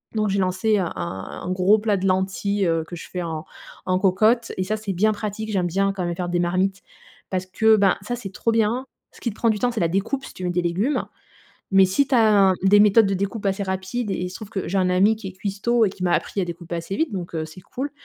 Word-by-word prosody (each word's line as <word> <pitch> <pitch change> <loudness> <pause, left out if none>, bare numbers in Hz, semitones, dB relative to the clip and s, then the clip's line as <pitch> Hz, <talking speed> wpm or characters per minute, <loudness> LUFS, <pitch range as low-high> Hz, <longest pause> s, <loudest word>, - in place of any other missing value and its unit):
donc 215 -1 +1
j'ai 195 0 0
lancé 190 +4 +1
un 180 -3 -1
un 95 +2 -6
un 180 - -3
gros 190 +3 +4
plat 210 -2 0
de 195 +1 -1
lentilles, 190 +1 0
heu, 165 -1 0
que 175 - -7
je 170 - -10
fais 180 - -4
en 160 -2 -4 0.4
en 185 0 +1
cocotte 215 +5 +2
et 185 - -1
ça 215 +3 -2
c'est 210 -3 -4
bien 215 +5 +3
pratique, 215 +1 -4
j'aime 185 -3 +1
bien 195 +3 +1
quand 185 -2 -3
même 170 0 -2
faire 175 0 -3
des 175 0 0
marmites 185 +3 0 0.5
parce 185 -1 -2
que, 220 +3 +4
ben, 195 -3 +3
ça, 245 +4 -3
c'est 205 -5 -8
trop 230 +4 -1
bien. 230 +4 +1 0.3
Ce - - -17
qui 235 - -2
te 210 - -9
prend 230 - +1
du 210 -2 0
temps, 245 0 +1
c'est 225 - -3
la 170 - +3
découpe 220 +9 -1
si - - -10
tu 185 - -6
mets 175 - 0
des 180 0 0
légumes 190 +12 0 0.7
mais 195 0 +6
si 190 +9 +2
tu 270 - 0
as 210 -4 +5
un - - +2
des 200 +2 +6
méthodes 210 +1 +6
de 195 - 0
découpe 200 +3 -3
assez 195 +1 0
rapides 190 +4 -3
et - - 0
il 180 0 -3
se 185 - -8
trouve 215 - -9
que 195 -4 -4
j'ai 195 +2 0
un 185 -1 +2
ami 195 +4 +3
qui 215 -3 -9
est - - -8
cuistot 205 +5 0
et 195 - +1
qui 185 - -10
m'a 175 -1 +2
appris 195 - 0
à - - +1
découper 170 0 -6
assez 170 +4 -4
vite 320 -4 0
donc, 175 -3 -5
heu, 160 -1 -2
c'est 160 +4 -11
cool. 275 +9 -5
195 Hz, 280 wpm, -23 LUFS, 180-215 Hz, 0.7 s, mais